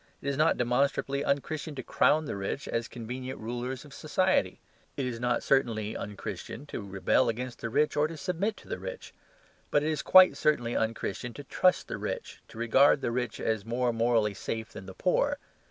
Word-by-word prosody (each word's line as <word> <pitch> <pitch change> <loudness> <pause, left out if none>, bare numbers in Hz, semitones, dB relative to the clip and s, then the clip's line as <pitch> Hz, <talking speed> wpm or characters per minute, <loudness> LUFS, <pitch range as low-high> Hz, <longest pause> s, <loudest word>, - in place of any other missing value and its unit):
It - - -8
is 140 - -1
not 155 +3 +3
demonstrably 135 +3 +1
un 140 0 +2
Christian 155 0 -5
to 130 - -5
crown 155 +6 +3
the - - -4
rich 100 +8 -4
as 115 0 -2
convenient 125 +3 -6
rulers 125 +4 -4
of 145 - -13
society. 155 - +1 0.4
It 135 - -1
is 120 -2 -3
not 120 0 0
certainly 110 -6 +1
un 105 - -5
Christian 130 +6 -6
to - - -3
rebel 95 +1 +1
against 125 +2 -4
the 115 - -2
rich 150 +6 +2
or 150 +1 +3
to 165 0 -8
submit 190 +6 -1
to - - -15
the - - -4
rich. - - -7 0.6
But 145 - +2
it 155 - +1
is 155 - -1
quite 185 0 +7
certainly 120 -6 +1
un 110 0 +1
Christian 115 +4 -5
to 145 - -7
trust 180 +6 +2
the - - -5
rich, - - -5
to - - -14
regard 130 +5 +4
the - - -1
rich 120 -2 -2
as 110 -2 -1
more 120 +2 0
morally 115 -2 +2
safe 110 +3 -4
than 95 -3 -9
the 95 - -9
poor. 285 - +1
125 Hz, 205 wpm, -29 LUFS, 115-150 Hz, 0.6 s, quite